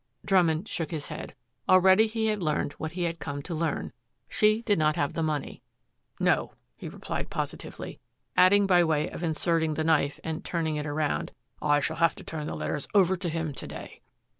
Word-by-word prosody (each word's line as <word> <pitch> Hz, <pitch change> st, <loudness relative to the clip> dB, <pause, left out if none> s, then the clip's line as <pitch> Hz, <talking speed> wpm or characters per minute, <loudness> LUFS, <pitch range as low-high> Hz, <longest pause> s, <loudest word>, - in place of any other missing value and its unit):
Drummond 180 Hz, -1 st, +3 dB
shook 165 Hz, -7 st, -3 dB
his 155 Hz, -3 st, -4 dB
head. -, -, -7 dB, 0.3 s
Already 190 Hz, +4 st, +6 dB
he 220 Hz, 0 st, -1 dB
had 215 Hz, -2 st, 0 dB
learned 150 Hz, -3 st, 0 dB
what 160 Hz, 0 st, -4 dB
he 180 Hz, 0 st, -2 dB
had 170 Hz, -1 st, -2 dB
come 145 Hz, -1 st, -5 dB
to 170 Hz, -, -5 dB
learn. 160 Hz, -2 st, -2 dB, 0.3 s
She 215 Hz, +2 st, +2 dB
did 205 Hz, -6 st, +2 dB
not 155 Hz, 0 st, +3 dB
have 145 Hz, -, 0 dB
the 165 Hz, -, -2 dB
money. 155 Hz, -3 st, -2 dB, 0.6 s
"No," -, -, +2 dB, 0.2 s
he -, -, -7 dB
replied -, -, -5 dB
positively, -, -, -5 dB, 0.4 s
adding, 200 Hz, +2 st, +6 dB
by 180 Hz, -2 st, +5 dB
way 155 Hz, -2 st, +1 dB
of -, -, -7 dB
inserting 160 Hz, -1 st, +1 dB
the 160 Hz, -, 0 dB
knife 155 Hz, -3 st, +2 dB
and 160 Hz, 0 st, -4 dB
turning 160 Hz, -3 st, -1 dB
it 150 Hz, 0 st, -3 dB
around, 145 Hz, -, -1 dB, 0.3 s
"I 145 Hz, -1 st, +3 dB
shall 140 Hz, -, -2 dB
have 165 Hz, +1 st, +3 dB
to -, -, -10 dB
turn 155 Hz, -2 st, -5 dB
the -, -, -4 dB
letters 75 Hz, +1 st, -3 dB
over 190 Hz, -2 st, +5 dB
to 175 Hz, -1 st, -2 dB
him 160 Hz, -2 st, -2 dB
to -, -, -7 dB
day." -, -, -9 dB
160 Hz, 195 wpm, -28 LUFS, 150-185 Hz, 0.6 s, Already